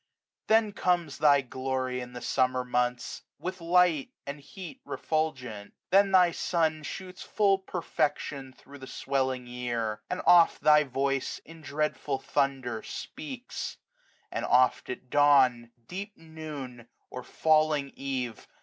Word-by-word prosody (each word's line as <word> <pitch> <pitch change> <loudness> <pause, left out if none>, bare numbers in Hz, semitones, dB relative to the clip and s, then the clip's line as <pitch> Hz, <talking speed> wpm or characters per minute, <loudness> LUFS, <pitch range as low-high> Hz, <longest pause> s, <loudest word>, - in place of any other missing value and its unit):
Then 220 -1 +4
comes 175 -7 0
thy 145 -2 +5
glory 130 0 -3
in 125 0 -8
the 120 - -7
Summer 130 -1 +1
months, 125 0 -1 0.2
With 185 0 -5
light 170 -4 +3 0.2
and 140 +1 -6
heat 185 - -10
refulgent. 130 -10 -3 0.2
Then 195 +1 +5
thy 180 -2 +6
sun 160 -2 0
Shoots 185 +5 -7
full 200 -2 +2
perfection 145 -7 -2
thro* 140 +2 -15
the 130 - -9
svirelling 130 -2 -1
year: 120 -3 -3
10 180 - -1
And - - -7
oft 175 -1 +6
thy 150 0 +6
voice 135 0 -1
in 165 0 -13
dreadful 150 -1 -2
thunder 130 -5 -1
speaks; 265 -3 -7 0.5
And - - -3
oft 130 0 +3
at 125 0 -7
dawn, 130 -5 +4 0.2
deep 200 +3 -7
noon, 150 -7 -8 0.2
or 125 - -5
falling 155 0 +2
eve. 130 -4 -4
140 Hz, 130 wpm, -28 LUFS, 130-170 Hz, 0.5 s, thy